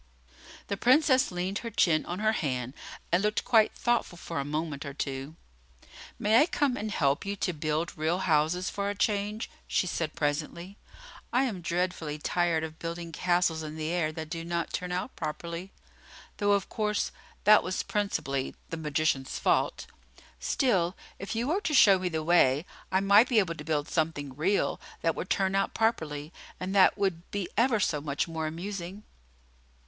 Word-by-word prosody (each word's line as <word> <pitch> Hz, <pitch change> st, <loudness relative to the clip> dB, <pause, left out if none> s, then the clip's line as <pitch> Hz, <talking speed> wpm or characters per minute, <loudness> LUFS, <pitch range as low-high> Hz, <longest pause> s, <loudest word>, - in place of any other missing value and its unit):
The 200 Hz, -, -3 dB
Princess 260 Hz, +1 st, +4 dB
leaned 180 Hz, +3 st, -2 dB
her 235 Hz, -, -5 dB
chin 165 Hz, -8 st, +2 dB
on 175 Hz, -, -3 dB
her 215 Hz, +2 st, +2 dB
hand, 130 Hz, -, -2 dB, 0.4 s
and 175 Hz, +2 st, +3 dB
looked 210 Hz, +1 st, 0 dB
quite 225 Hz, -3 st, +4 dB
thoughtful 240 Hz, -7 st, 0 dB
for 165 Hz, -2 st, -5 dB
a -, -, -1 dB
moment 150 Hz, 0 st, -3 dB
or 140 Hz, -2 st, -7 dB
two. 135 Hz, +2 st, -4 dB, 0.8 s
"May 215 Hz, +3 st, +4 dB
I 305 Hz, -, +4 dB
come 285 Hz, -7 st, +1 dB
and 215 Hz, -2 st, -3 dB
help 140 Hz, -6 st, +1 dB
you 200 Hz, 0 st, -3 dB
to 185 Hz, -2 st, -1 dB
build 155 Hz, +2 st, -2 dB
real 160 Hz, +3 st, 0 dB
houses, 170 Hz, +1 st, +1 dB
for 200 Hz, 0 st, -2 dB
a 205 Hz, -, -3 dB
change?" 205 Hz, +1 st, 0 dB, 0.2 s
she -, -, +1 dB
said 165 Hz, -3 st, -2 dB
presently. 160 Hz, +6 st, -3 dB, 0.5 s
"I 250 Hz, +3 st, +3 dB
am 215 Hz, -9 st, -2 dB
dreadfully 170 Hz, -3 st, -2 dB
tired 170 Hz, +1 st, +1 dB
of 160 Hz, 0 st, -7 dB
building 170 Hz, 0 st, -5 dB
castles 175 Hz, -2 st, +1 dB
in 155 Hz, 0 st, -6 dB
the 155 Hz, 0 st, -3 dB
air 170 Hz, -3 st, 0 dB
that 155 Hz, 0 st, -7 dB
do 165 Hz, -1 st, -4 dB
not 170 Hz, 0 st, -3 dB
turn 180 Hz, 0 st, -3 dB
out 180 Hz, +8 st, -3 dB
properly 170 Hz, +4 st, -5 dB, 0.7 s
though, 205 Hz, -1 st, +3 dB
of 200 Hz, -1 st, +1 dB
course, 210 Hz, -1 st, -1 dB, 0.3 s
that 210 Hz, +1 st, +7 dB
was 185 Hz, -, -2 dB
principally 140 Hz, -10 st, -2 dB, 0.2 s
the 165 Hz, -, -3 dB
magician's 150 Hz, -3 st, 0 dB
fault! -, -, +1 dB, 0.5 s
Still, 190 Hz, -, +1 dB, 0.2 s
if 200 Hz, +3 st, -5 dB
you 235 Hz, +3 st, -1 dB
were 375 Hz, +6 st, +1 dB
to 305 Hz, -7 st, 0 dB
show 195 Hz, -7 st, +7 dB
me 180 Hz, -1 st, -1 dB
the 160 Hz, -2 st, -2 dB
way, 155 Hz, -3 st, +4 dB, 0.3 s
I 190 Hz, +1 st, +3 dB
might 205 Hz, +5 st, +6 dB
be 240 Hz, -, +2 dB
able 185 Hz, -6 st, +3 dB
to -, -, -9 dB
build 150 Hz, -2 st, -1 dB
something 150 Hz, -4 st, -2 dB
real 185 Hz, +8 st, +1 dB, 0.2 s
that 165 Hz, -, +2 dB
would 185 Hz, -, -5 dB
turn 190 Hz, -1 st, +1 dB
out 195 Hz, 0 st, 0 dB
properly; 160 Hz, -9 st, -1 dB, 0.3 s
and 185 Hz, +1 st, -3 dB
that 195 Hz, 0 st, +5 dB
would 190 Hz, -4 st, -1 dB
be 200 Hz, -3 st, -3 dB
ever 235 Hz, -1 st, +3 dB
so 150 Hz, -6 st, 0 dB
much 145 Hz, +1 st, -1 dB
more 160 Hz, -1 st, -3 dB
amusing." 185 Hz, +4 st, -6 dB
175 Hz, 180 wpm, -29 LUFS, 155-205 Hz, 0.8 s, that